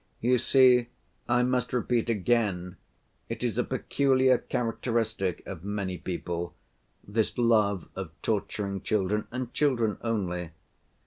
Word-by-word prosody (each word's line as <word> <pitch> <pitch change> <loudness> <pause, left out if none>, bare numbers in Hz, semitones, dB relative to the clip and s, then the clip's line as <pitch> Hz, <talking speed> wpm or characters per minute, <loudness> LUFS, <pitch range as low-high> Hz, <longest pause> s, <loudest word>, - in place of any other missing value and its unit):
You 125 +1 +3
see, 125 -1 +5 0.4
I 120 +1 +4
must 125 0 0
repeat 120 -1 +1
again, 100 -5 0 0.5
it 115 0 -4
is 120 -1 0
a - - +3
peculiar 130 -1 +2
characteristic 115 -5 -1
of 90 -4 -7
many 100 -3 -3
people, 85 -1 -4 0.5
this 110 +2 0
love 110 -5 +3
of 95 -3 -5
torturing 100 -2 -2
children, 105 0 0
and 125 0 -5
children 120 -8 +1
only. 90 -7 -2
110 Hz, 120 wpm, -28 LUFS, 95-125 Hz, 0.5 s, see